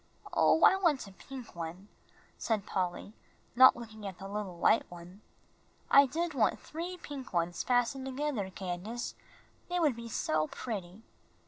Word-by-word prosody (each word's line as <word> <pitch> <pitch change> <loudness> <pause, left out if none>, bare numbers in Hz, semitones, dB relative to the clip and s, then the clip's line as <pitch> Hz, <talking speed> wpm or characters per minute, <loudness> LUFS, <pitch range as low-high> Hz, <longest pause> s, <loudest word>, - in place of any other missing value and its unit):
"Oh, 325 - +4
I 380 - +7
want 330 - +2
a 195 - -12
pink 255 +2 -10
one," 170 +4 -6 0.5
said 215 -3 -1
Polly, 185 +1 -3 0.4
not 260 +1 +9
looking 220 -3 -8
at 190 -2 -7
the 195 - -8
little 200 -3 -5
white 220 - +3
one. 175 +3 -12 0.7
"I 280 0 +8
did 330 +5 -2
want 250 -6 +2
three 345 +3 -6
pink 275 - -8
ones 175 0 0
fastened 250 +2 +1
together, 265 -7 -2
Candace, 190 +5 -5 0.6
they 355 0 0
would 300 -7 +3
be 235 0 -8
so 155 -7 0
pretty." 200 -2 -6
225 Hz, 150 wpm, -31 LUFS, 185-270 Hz, 0.7 s, not